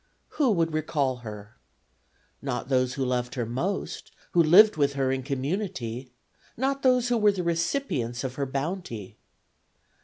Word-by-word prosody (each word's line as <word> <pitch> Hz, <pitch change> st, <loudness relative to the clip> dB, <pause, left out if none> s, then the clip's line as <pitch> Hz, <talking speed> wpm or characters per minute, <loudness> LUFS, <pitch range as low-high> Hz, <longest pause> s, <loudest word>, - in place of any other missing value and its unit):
Who 280 Hz, -4 st, +4 dB
would 165 Hz, -3 st, +1 dB
recall 145 Hz, -4 st, 0 dB
her? 105 Hz, -3 st, -10 dB, 0.8 s
Not 135 Hz, -1 st, -3 dB
those 130 Hz, -1 st, +1 dB
who 135 Hz, -, -1 dB
loved 125 Hz, -1 st, -1 dB
her 120 Hz, -3 st, -1 dB
most, 150 Hz, -, -3 dB, 0.2 s
who 175 Hz, -, +5 dB
lived 190 Hz, +7 st, +7 dB
with 140 Hz, -2 st, +2 dB
her 135 Hz, -1 st, 0 dB
in 135 Hz, 0 st, -1 dB
community; 135 Hz, -, -3 dB, 0.5 s
not 270 Hz, +3 st, 0 dB
those 250 Hz, -1 st, +3 dB
who 240 Hz, -1 st, +2 dB
were 210 Hz, -1 st, +5 dB
the 185 Hz, -2 st, -3 dB
recipients 165 Hz, -, -1 dB
of 130 Hz, -2 st, -3 dB
her 140 Hz, +1 st, -2 dB
bounty. 135 Hz, -, -4 dB
140 Hz, 150 wpm, -27 LUFS, 125-185 Hz, 0.8 s, lived